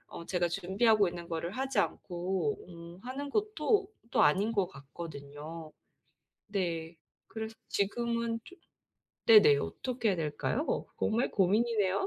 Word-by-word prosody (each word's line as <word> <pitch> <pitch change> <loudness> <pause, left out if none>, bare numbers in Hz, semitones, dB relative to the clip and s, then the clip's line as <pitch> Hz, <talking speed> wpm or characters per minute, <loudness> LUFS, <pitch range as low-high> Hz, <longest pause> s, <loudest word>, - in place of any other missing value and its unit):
어 170 - -7
제가 175 -2 +1
준비하고 195 +4 +3
있는 170 0 -6
거를 165 0 -3
하지 265 0 0
않고 185 +3 -1
음 170 +1 -11
하는 275 +3 -5
것도 425 -1 +1 0.2
또 - - +4
아닌 195 +9 +4
것 200 -5 +1
같거든요. 145 +2 -9 0.8
네. 170 -5 -2 0.3
그래서 220 0 -6
지금은 235 +2 0
좀 370 - -14 0.7
네네. 205 -11 +8
어떻게 235 - -2
해야 190 - +2
될까요? 165 - -1
정말 230 +4 +1
고민이네요. 205 0 +2
195 Hz, 265 characters per minute, -31 LUFS, 170-230 Hz, 0.8 s, 네네